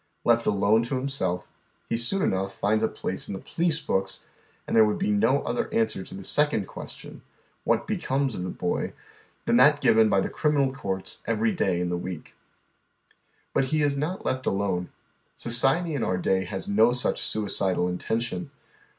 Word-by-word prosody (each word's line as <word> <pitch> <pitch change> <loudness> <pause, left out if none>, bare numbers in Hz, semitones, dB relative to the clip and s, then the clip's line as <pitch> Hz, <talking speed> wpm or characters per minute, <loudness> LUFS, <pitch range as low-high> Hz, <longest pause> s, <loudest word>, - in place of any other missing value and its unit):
Left 115 0 +3
alone 105 +2 +3
to 125 - -2
himself, 130 -10 -2 0.4
he - - -1
soon 125 +12 +1
enough 95 0 -1
finds 110 +2 +1
a - - +3
place - - -5
in - - -4
the - - -6
police 165 -2 0
books, 95 -9 -2 0.4
and - - -2
there 110 - +8
would 105 -1 +1
be 200 +2 0
no 205 -10 +2
other 120 - -2
answer 110 -4 0
to - - -10
the 95 - -8
second 145 -4 +1
question: - - -10 0.2
" - - -40
what - - +2
becomes 135 -1 -1
of 90 - -4
the 90 - -3
boy? 90 - -2 0.3
" - - -33
than - - +3
that - - +6
given 110 -1 +4
by 100 - +3
the - - 0
criminal 145 -4 +1
courts 95 -8 -5
every 225 0 +1
day 125 - 0
in 90 0 -1
the 90 - -1
week; 90 -3 -7 1.2
But 135 - +2
he 155 +3 0
is 145 -1 +2
not 150 +7 -3
left 130 0 -2
alone. 95 -3 -1 0.5
Society 135 +8 +2
in 140 - -2
our 90 - 0
day 95 +1 +1
has 95 +1 -5
no 110 +3 +5
sucli 125 0 0
suicidal 95 -4 +1
intention. 90 +2 -2
110 Hz, 185 wpm, -26 LUFS, 95-140 Hz, 1.2 s, there